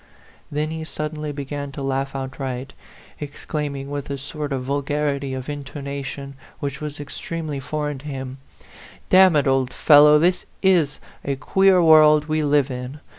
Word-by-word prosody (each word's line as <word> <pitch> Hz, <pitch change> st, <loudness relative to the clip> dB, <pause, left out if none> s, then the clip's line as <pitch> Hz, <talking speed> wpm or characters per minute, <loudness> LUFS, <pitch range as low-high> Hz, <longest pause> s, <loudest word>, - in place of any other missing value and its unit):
Then 150 Hz, +1 st, -1 dB
he 160 Hz, 0 st, -4 dB
suddenly 150 Hz, -1 st, -4 dB
began 140 Hz, 0 st, -5 dB
to 140 Hz, -, -6 dB
laugh 135 Hz, 0 st, -2 dB
outright, 135 Hz, 0 st, -5 dB, 0.5 s
exclaiming, 145 Hz, -1 st, -5 dB
with 145 Hz, -1 st, -4 dB
a 140 Hz, -, -3 dB
sort 145 Hz, +2 st, -6 dB
of 130 Hz, -2 st, -2 dB
vulgarity 140 Hz, 0 st, -1 dB
of 130 Hz, -1 st, -6 dB
intonation 140 Hz, -1 st, -6 dB, 0.3 s
which 140 Hz, 0 st, -4 dB
was 150 Hz, -1 st, -5 dB
extremely 150 Hz, 0 st, -5 dB
foreign 150 Hz, +1 st, -3 dB
to 145 Hz, -, -11 dB
him 135 Hz, -2 st, -6 dB, 0.7 s
"D -, -, +7 dB
n 190 Hz, -3 st, +7 dB
it, 145 Hz, -, +3 dB
old 135 Hz, -2 st, +1 dB
fellow, 150 Hz, 0 st, +7 dB
this 175 Hz, +4 st, +1 dB, 0.2 s
is 175 Hz, -7 st, +3 dB, 0.2 s
a 140 Hz, -, -1 dB
queer 190 Hz, +5 st, +3 dB
world 155 Hz, -2 st, +6 dB
we 155 Hz, 0 st, 0 dB
live 145 Hz, -2 st, +2 dB
in 125 Hz, +3 st, -6 dB
145 Hz, 155 wpm, -22 LUFS, 135-150 Hz, 0.7 s, D